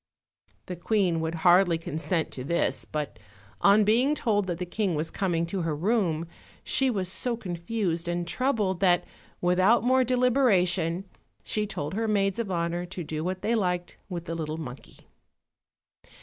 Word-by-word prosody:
The 180 - -5
queen 175 -2 +1
would 160 +1 -2
hardly 175 -1 +6
consent 160 +1 -2
to 130 - -6
this; 170 +6 0
but 145 -7 -4 0.4
on 205 +2 +6
being 245 +8 +3
told 205 -7 0
that 175 -2 -2
the 180 - -3
king 185 0 -1
was 155 +2 -2
coming 170 -4 0
to 180 +2 -3
her 165 -2 -1
room, 170 -2 0 0.4
she 270 -1 +1
was 195 -6 -1
so 235 +6 +1
confused 175 -2 -2
and 175 0 -2
troubled 215 -7 0
that, 180 -3 +3 0.4
without 185 +7 +4
more 260 +1 +4
deliberation, 200 -9 +2 0.4
she 210 -1 -1
told 150 -5 -4
her 225 +3 -1
maids 200 0 +1
of 225 -4 -2
honor 170 -1 -1
to 180 0 -6
do 155 0 -4
what 185 +1 -3
they 230 - +1
liked 180 -5 -1
with 175 -2 -5
the 165 - -4
little 155 -1 -4
monkey. 135 -5 -10
180 Hz, 165 wpm, -27 LUFS, 170-215 Hz, 0.4 s, hardly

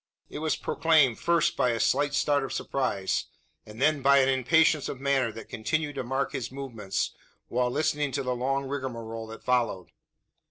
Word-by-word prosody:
It - - -5
was 155 0 0
proclaimed, 150 -8 +2
first 170 -2 +2
by 125 - +2
a 115 -1 -1
slight 145 +6 +2
start 145 -1 +2
of 135 - -5
surprise, 115 -8 -1 0.4
and 105 +1 -11
then 150 +1 +2
by 140 +1 +5
an 135 -1 +4
impatience 140 +3 +3
of 130 - -6
manner 135 -4 +1
that 115 - -9
continued 145 +7 -2
to 135 - -4
mark 135 +3 -1
his 120 -1 -4
movements, 120 -8 -3 0.4
while 125 +1 +1
listening 150 +1 0
to 140 - -1
the 125 -1 -1
long 135 +3 -1
rigmarole 115 -5 -5
that 110 0 -10
followed. 115 -9 0
135 Hz, 175 wpm, -27 LUFS, 115-145 Hz, 0.4 s, by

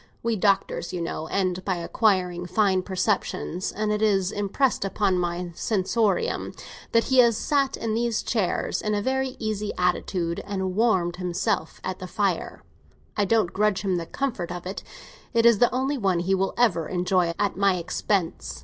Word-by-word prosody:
We 230 -1 +1
doctors, 195 -3 +1
you 180 - -3
know, 165 -1 -4
end 185 0 -1
by 190 -1 0
acquiring 180 -1 +1
fine 190 0 +2
perceptions, 185 -1 -1
and 210 0 -1
it 210 0 0
is 195 -3 +2
impressed 205 +6 0
upon 195 -1 +1
my 175 0 -2
sensorium 220 - 0 0.4
that 230 0 +4
he 260 +2 +2
has 235 -3 +5
sat 275 +1 +1
in 225 -1 -2
these 230 0 0
chairs, 210 -7 -1
in 210 0 0
a 205 - 0
very 265 +1 -1
easy 215 -1 -2
attitude, 180 -1 0
and 190 -2 -3
warmed 190 -6 +2
himself 180 0 -2
at 185 0 -4
that 185 - -7
fire. 195 -4 -1 0.5
I 205 - +2
don't 215 -4 +2
grudge 210 0 +1
him 190 -3 +1
the 165 -1 -4
comfort 245 -11 -3
of 175 0 -6
it; 190 +2 -5 0.5
it 230 0 +4
is 235 -3 +6
the 245 - +4
only 265 +2 -1
one 190 -5 +1
he 190 +2 0
will 195 0 0
ever 180 -10 +2
enjoy 180 -1 +1
at 200 - 0
my 195 0 +3
expense. 180 +1 -2
195 Hz, 175 wpm, -25 LUFS, 180-220 Hz, 0.5 s, is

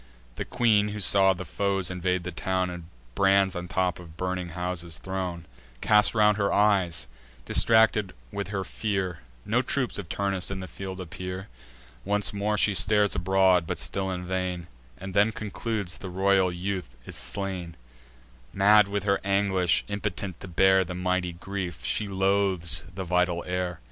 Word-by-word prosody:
The - - -4
queen, 105 -4 +2
who 105 0 -5
saw 95 -1 +4
the 90 +1 -7
foes 95 +1 -1
invade 90 0 -1
the 90 - -4
town, 95 +1 -1
And 90 -1 -8 0.3
brands 95 +1 +3
on 90 0 -4
tops 90 -2 0
of 85 -1 -14
burning 90 -1 -3
houses 90 -3 -3
thrown, 90 +3 -4 0.3
Cast 105 - +3
round 105 -1 +4
her 100 -2 +1
eyes, 95 -8 +2 0.4
distracted 110 -3 +3 0.2
with 100 0 -4
her 100 -1 -3
fear— 95 -5 -3 0.3
No 120 +4 +2
troops 130 -3 -1
of 90 -5 -7
Turnus 100 -2 -1
in 100 -1 -4
the 95 - -6
field 95 0 -7
appear. 90 +2 -6 0.5
Once 105 +1 +1
more 105 +1 0
she 105 +1 +3
stares 105 +1 +4
abroad, 95 -2 +3
but - - -2
still 95 -1 -1
in 90 -1 -4
vain, 90 -1 -2 0.3
And 95 0 -7
then 105 +3 +4
concludes 105 -5 -4
the 95 - -7
royal 95 0 +2
youth 90 -6 -4
is - - -8
slain. 95 -4 -3 0.8
Mad 105 +1 +6
with 100 0 -2
her 100 -1 +2
anguish, 95 -2 +1
impotent 100 -3 -4
to - - -8
bear 95 +2 +4
The 90 0 -6
mighty 90 -1 -1
grief, 90 -1 -5
she 105 - -1
loathes 95 -4 +1
the 95 - -3
vital 90 -1 +1
air. 90 -1 -3
95 Hz, 165 wpm, -27 LUFS, 90-100 Hz, 0.8 s, Mad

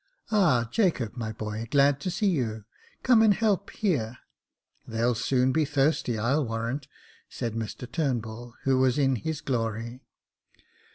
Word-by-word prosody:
" - - -28
Ah, 155 - +3
Jacob, 170 - +1
my 115 -3 -4
boy, 110 +1 -5
glad 140 0 +4
to 165 - -3
see 185 +4 -1
you 110 - -2 0.2
— - - -30
come 245 -3 +5
and 215 -3 +5
help 205 -3 +1
here 125 - -1 0.4
— - - -43
they'll 115 +2 +1
soon 130 +2 +1
be 155 +3 +2
thirsty, 140 -4 +1
I'll 130 +8 +1
warrant," 115 +4 -3 0.4
said 115 -2 -4
Mr 110 +1 -5
Turnbull, 120 -5 -3
who 135 -1 +2
was 130 0 +3
in 135 -3 +2
his 160 +5 -4
glory. 115 -2 -2
130 Hz, 160 wpm, -27 LUFS, 115-155 Hz, 0.4 s, come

